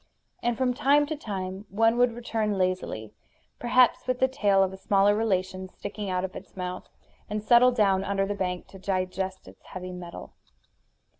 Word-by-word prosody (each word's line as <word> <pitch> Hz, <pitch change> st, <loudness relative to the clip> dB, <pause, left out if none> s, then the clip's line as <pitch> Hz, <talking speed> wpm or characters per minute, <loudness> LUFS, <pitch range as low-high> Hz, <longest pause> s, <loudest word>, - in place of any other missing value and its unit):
And 240 Hz, -1 st, 0 dB
from 255 Hz, -1 st, +1 dB
time 285 Hz, +4 st, +4 dB
to 310 Hz, +2 st, -3 dB
time 195 Hz, -6 st, -5 dB
one 225 Hz, +3 st, +3 dB
would 245 Hz, -1 st, +4 dB
return 220 Hz, -3 st, -1 dB
lazily, 185 Hz, -, -2 dB, 0.5 s
perhaps 245 Hz, 0 st, +3 dB
with 255 Hz, -1 st, +1 dB
the 260 Hz, -, +3 dB
tail 205 Hz, -8 st, +3 dB
of 190 Hz, 0 st, -1 dB
a -, -, -8 dB
smaller 200 Hz, +1 st, +3 dB
relation 185 Hz, -3 st, -1 dB
sticking 205 Hz, +1 st, -6 dB
out 185 Hz, 0 st, 0 dB
of 185 Hz, -, -8 dB
its -, -, -11 dB
mouth, 180 Hz, 0 st, -5 dB, 0.4 s
and 210 Hz, 0 st, -3 dB
settle 240 Hz, +2 st, +6 dB
down 195 Hz, -5 st, +2 dB
under 195 Hz, 0 st, 0 dB
the 205 Hz, -, -2 dB
bank 180 Hz, -2 st, -3 dB
to 195 Hz, -, -12 dB
digest 190 Hz, 0 st, -3 dB
its -, -, -15 dB
heavy 185 Hz, 0 st, -7 dB
meal. 180 Hz, -1 st, -9 dB
200 Hz, 175 wpm, -27 LUFS, 185-235 Hz, 0.5 s, settle